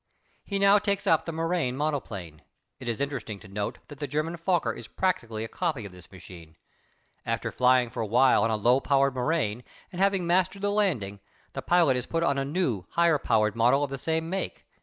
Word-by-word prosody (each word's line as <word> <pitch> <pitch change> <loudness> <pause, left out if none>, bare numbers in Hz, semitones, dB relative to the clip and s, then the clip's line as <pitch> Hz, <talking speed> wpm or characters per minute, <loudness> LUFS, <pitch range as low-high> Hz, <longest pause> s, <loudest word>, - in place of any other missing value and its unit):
He 200 - -3
now 200 +1 +5
takes 200 -1 -1
up 160 - +3
the 165 - -3
Morane 165 -5 -1
monoplane. 105 - -4 0.4
It 125 - -9
is 115 - -3
interesting 125 -7 -4
to - - -13
note 100 +1 -4
that 145 -2 -12
the 145 - -3
German 155 +4 -2
Fokker 170 -8 0
is 120 - -10
practically 115 -13 -2
a - - -4
copy 155 - -3
of 100 - -8
this 90 +1 -16
machine. 85 -3 -13 0.7
After - - -2
flying 125 -1 +3
for 125 - -4
a 110 - -2
while 125 +4 +4
on 115 - +2
a 110 - +1
low 120 +5 +3
powered 140 -1 +2
Morane 125 -4 -1 0.3
and 180 0 -5
having 195 -2 +2
mastered 185 +3 +1
the 205 - +1
landing, 140 - 0 0.3
the - - -4
pilot 170 -7 +3
is 125 - -4
put 165 0 -1
on 140 -4 +1
a - - 0
new, 135 - -2
higher 170 -1 +3
powered 110 -3 +1
model 125 +5 +3
of 140 - -3
the 135 - -4
same 160 +3 -1
make. 190 +3 -4
140 Hz, 210 wpm, -27 LUFS, 115-170 Hz, 0.7 s, now